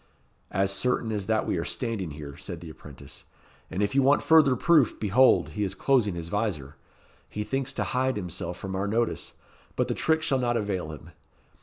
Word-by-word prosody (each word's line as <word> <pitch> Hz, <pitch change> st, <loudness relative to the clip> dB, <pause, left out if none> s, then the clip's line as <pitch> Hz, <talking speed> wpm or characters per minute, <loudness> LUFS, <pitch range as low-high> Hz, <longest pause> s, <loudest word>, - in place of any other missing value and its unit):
"As 95 Hz, +1 st, +1 dB
certain 115 Hz, +2 st, -1 dB
as 105 Hz, -3 st, -3 dB
that 110 Hz, 0 st, +1 dB
we -, -, -1 dB
are -, -, -2 dB
standing 115 Hz, -8 st, -3 dB
here," 70 Hz, -1 st, -8 dB
said 90 Hz, 0 st, -7 dB
the 85 Hz, -2 st, -9 dB
apprentice; 75 Hz, -3 st, -12 dB, 0.5 s
"and 100 Hz, -, -1 dB
if 100 Hz, -, -1 dB
you 140 Hz, -, +4 dB
want 140 Hz, +2 st, +4 dB
further 155 Hz, -5 st, +5 dB
proof, 150 Hz, -2 st, +3 dB
behold, 120 Hz, +5 st, +4 dB
he 105 Hz, -, -3 dB
is 95 Hz, -1 st, -2 dB
closing 110 Hz, -4 st, +2 dB
his 85 Hz, -1 st, -5 dB
visor. 85 Hz, -9 st, -2 dB, 0.6 s
He 105 Hz, -, -4 dB
thinks 135 Hz, +4 st, -2 dB
to -, -, -1 dB
hide 130 Hz, +1 st, 0 dB
himself 90 Hz, -2 st, -5 dB
from 95 Hz, 0 st, -5 dB
our 100 Hz, +2 st, -1 dB
notice; 115 Hz, +3 st, -1 dB, 0.4 s
but -, -, 0 dB
the -, -, -1 dB
trick 160 Hz, 0 st, +1 dB
shall 135 Hz, -3 st, +1 dB
not 120 Hz, -1 st, +1 dB
avail 95 Hz, -7 st, -2 dB
him. 75 Hz, -, -11 dB
105 Hz, 195 wpm, -27 LUFS, 90-125 Hz, 0.6 s, further